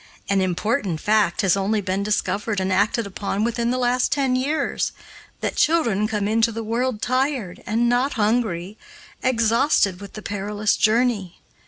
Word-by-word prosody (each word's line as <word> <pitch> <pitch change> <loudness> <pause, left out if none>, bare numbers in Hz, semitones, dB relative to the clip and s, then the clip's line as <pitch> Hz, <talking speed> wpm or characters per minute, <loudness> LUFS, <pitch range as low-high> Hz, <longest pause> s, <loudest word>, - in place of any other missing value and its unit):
An 200 -1 +2
important 185 - -1
fact 210 -3 +2
has 190 -2 +3
only 200 +2 0
been 190 0 -2
discovered 210 0 -1
and 190 0 0
acted 210 +4 +1
upon 200 +1 -3
within 235 0 0
the 250 - 0
last 250 0 +1
ten 270 -3 +1
years, 285 +5 -1 0.5
that - - -2
children 235 -11 +2
come 210 -2 -1
into 225 +2 +2
the 225 0 -5
world 230 0 -2
tired, 255 -7 -1
and 230 +3 +1
not 245 +4 +1
hungry, 210 -4 -1 0.4
exhausted 230 -5 +2
with 200 - -10
the 215 - -8
perilous 205 +1 -1
journey. 215 -5 +1
215 Hz, 155 wpm, -22 LUFS, 200-245 Hz, 0.5 s, has